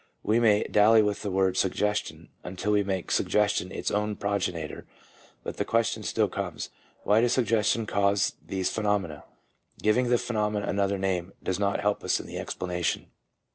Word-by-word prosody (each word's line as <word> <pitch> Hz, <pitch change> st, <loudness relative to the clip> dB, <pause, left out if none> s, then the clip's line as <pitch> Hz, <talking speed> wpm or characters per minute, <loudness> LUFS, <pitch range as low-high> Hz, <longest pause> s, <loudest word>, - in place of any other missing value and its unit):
We 110 Hz, +2 st, +2 dB
may 105 Hz, -3 st, +4 dB
dally 110 Hz, +1 st, +5 dB
with 105 Hz, -1 st, -1 dB
the 105 Hz, -, -3 dB
word 95 Hz, -1 st, +1 dB
"suggestion" 105 Hz, +2 st, -1 dB
until 95 Hz, +3 st, -3 dB
we 105 Hz, -1 st, +4 dB
make 95 Hz, -2 st, -3 dB
suggestion 105 Hz, -3 st, +1 dB
its -, -, -3 dB
own 105 Hz, 0 st, 0 dB
progenitor, 90 Hz, -7 st, -3 dB, 0.6 s
but -, -, -6 dB
the -, -, 0 dB
question 115 Hz, -1 st, 0 dB
still -, -, +1 dB
comes -, -, -5 dB, 0.2 s
— -, -, -33 dB
Why 105 Hz, +2 st, +4 dB
does 120 Hz, 0 st, +2 dB
suggestion 115 Hz, -2 st, +2 dB
cause 100 Hz, -1 st, +1 dB
these 95 Hz, -1 st, -2 dB
pheno 105 Hz, -1 st, +2 dB
mena? 80 Hz, -6 st, -9 dB, 0.5 s
Giving 120 Hz, +4 st, +2 dB
the 120 Hz, -, +4 dB
phenomena 105 Hz, -4 st, -1 dB
another 100 Hz, 0 st, 0 dB
name 95 Hz, -1 st, -2 dB
does 95 Hz, 0 st, -1 dB
not 100 Hz, -1 st, 0 dB
help 105 Hz, 0 st, 0 dB
us -, -, +1 dB
in -, -, -8 dB
the -, -, -6 dB
explanation. 90 Hz, -2 st, -3 dB
105 Hz, 175 wpm, -27 LUFS, 95-105 Hz, 0.6 s, dally